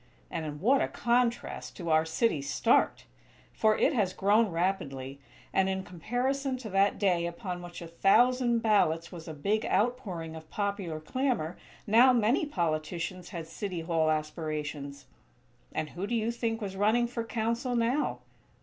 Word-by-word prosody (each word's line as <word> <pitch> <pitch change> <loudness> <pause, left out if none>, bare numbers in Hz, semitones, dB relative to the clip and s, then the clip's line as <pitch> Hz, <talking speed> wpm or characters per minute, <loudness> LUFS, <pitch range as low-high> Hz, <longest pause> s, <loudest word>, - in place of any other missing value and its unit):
And 160 -2 -3
in 150 -1 -6
what 260 - +4
a - - +1
contrast 240 0 -1
to 170 -3 -3
our 155 0 +4
city's 160 - 0
start! 230 +10 +2 0.5
For 215 -1 +3
it 300 - +3
has 200 -7 +1
grown 210 +3 +3
rapidly; 140 -7 -2 0.3
and, 190 0 +3
in 190 0 -2
comparison 255 - -2
to 230 -5 -8
that 195 +1 +3
day 180 -4 +2
upon 180 +1 -5
which 175 0 -8
a - - -7
thousand 240 +7 +3
ballots 170 -7 +2
was 170 -3 -9
a 160 - -5
big 205 +9 0
out 240 +5 +2
pouring 170 -9 -6
of 160 -1 -11
popular 200 -6 -2
clamor 190 - -1 0.3
now 235 +5 +6
many 240 +6 +2
politicians 170 - -2
had 170 -4 -6
City 175 +2 -5
Hall 165 -1 +1
aspirations. 150 -2 -3 0.7
And 155 - -3
who 185 +4 -4
do 235 - -1
you 225 0 0
think 230 -1 -2
was 195 -2 -4
running 215 +5 +3
for 235 -1 -3
Council, 230 +2 -1
now? 240 +5 0
195 Hz, 160 wpm, -29 LUFS, 165-230 Hz, 0.7 s, now